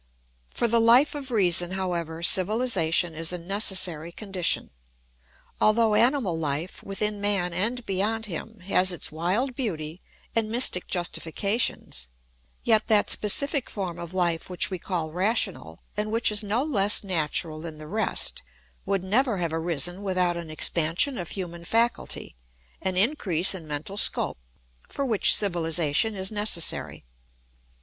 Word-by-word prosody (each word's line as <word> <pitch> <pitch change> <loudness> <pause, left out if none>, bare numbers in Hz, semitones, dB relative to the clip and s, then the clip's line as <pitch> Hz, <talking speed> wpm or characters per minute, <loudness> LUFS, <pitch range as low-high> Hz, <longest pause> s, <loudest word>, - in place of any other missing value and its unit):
For 235 - +1
the 230 +1 +4
Life 240 +6 +5
of 285 -2 -6
Reason, 180 -5 +2
however, 170 -3 -4
civilisation 185 -4 +3
is 165 +1 0
a 180 - -3
necessary 175 -3 0
condition. 190 -2 -2 0.9
Although 220 0 +3
animal 230 - +2
life, 160 +2 -3
within 205 +1 -3
man 195 -4 +1
and 230 +7 -1
beyond 210 +4 -1
him, 210 +3 -8
has 185 0 +1
its 175 - -1
wild 185 - -1
beauty 175 - -4 0.3
and 225 -1 +1
mystic 230 -6 +2
justifications, 175 - -2 0.6
yet 220 -2 +3
that 215 -2 +3
specific 275 +6 +2
form 185 -5 -5
of 170 -1 -7
life 175 -3 -1
which 180 +1 +2
we 185 - -4
call 165 -4 -3
rational, 185 - -2
and 210 +1 -3
which 230 0 +2
is 210 0 +2
no 215 +5 -1
less 210 -10 +2
natural 160 -3 -1
than 160 -2 -7
the 155 - -9
rest, 215 +6 0 0.5
would 195 -2 -1
never 225 +3 +1
have 170 -3 -2
arisen 170 +2 -1
without 185 -3 0
an 170 -2 -7
expansion 170 - +1
of 175 - -6
human 170 -3 -6
faculty, 230 - -1 0.5
an 185 -1 -2
increase 190 - +2
in 170 -5 -8
mental 150 +7 -5
scope, - - +1 0.5
for 280 - -3
which 225 -6 +6
civilisation 170 +1 +1
is 190 +1 -1
necessary. 205 -5 0
190 Hz, 140 wpm, -25 LUFS, 170-220 Hz, 0.9 s, which